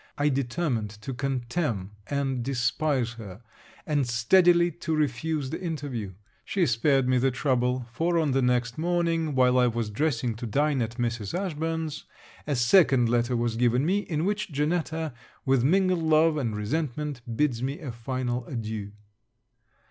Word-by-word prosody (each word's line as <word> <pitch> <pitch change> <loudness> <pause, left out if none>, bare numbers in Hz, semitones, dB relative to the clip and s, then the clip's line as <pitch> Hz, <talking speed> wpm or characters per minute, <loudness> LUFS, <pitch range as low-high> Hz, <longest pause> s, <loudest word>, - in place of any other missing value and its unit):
I 145 +1 +2
determined 130 -4 -1
to 130 +5 -5
contemn 125 - -2 0.2
and 135 -3 -1
despise 125 0 0
her; 100 +1 -10 0.4
and 145 -4 0
steadily 170 +9 +4
to 165 -1 -3
refuse 150 0 -1
the - - -4
interview. 140 - -4 0.3
She 190 -3 +1
spared 130 +2 +2
me 130 0 +3
the 135 +2 +3
trouble; 125 -1 0
for, 170 +7 0
on 155 -4 +2
the 135 +1 +2
next 125 0 0
morning, 165 -3 0
while 125 -1 +4
I 125 - +4
was 115 -2 -2
dressing 125 -1 0
to 120 - -5
dine 145 +4 +1
at 115 +1 -3
Mrs. 115 - -2
Ashburn's, 160 -4 -3 0.4
a 145 - 0
second 125 -1 +4
letter 120 +1 +1
was 115 -1 -1
given 125 +3 +2
me, 190 +5 +2
in 165 -5 -2
which 205 -2 -1
Janetta, 160 +1 -1 0.3
with 135 -3 +3
mingled 185 +3 +3
love 160 0 +4
and 120 -8 -2
resentment, 145 +4 -3 0.2
bids 135 -6 +1
me 135 +3 -2
a 145 -6 -6
final 125 +1 -3
adieu. 110 -5 -5
135 Hz, 155 wpm, -27 LUFS, 120-160 Hz, 0.4 s, steadily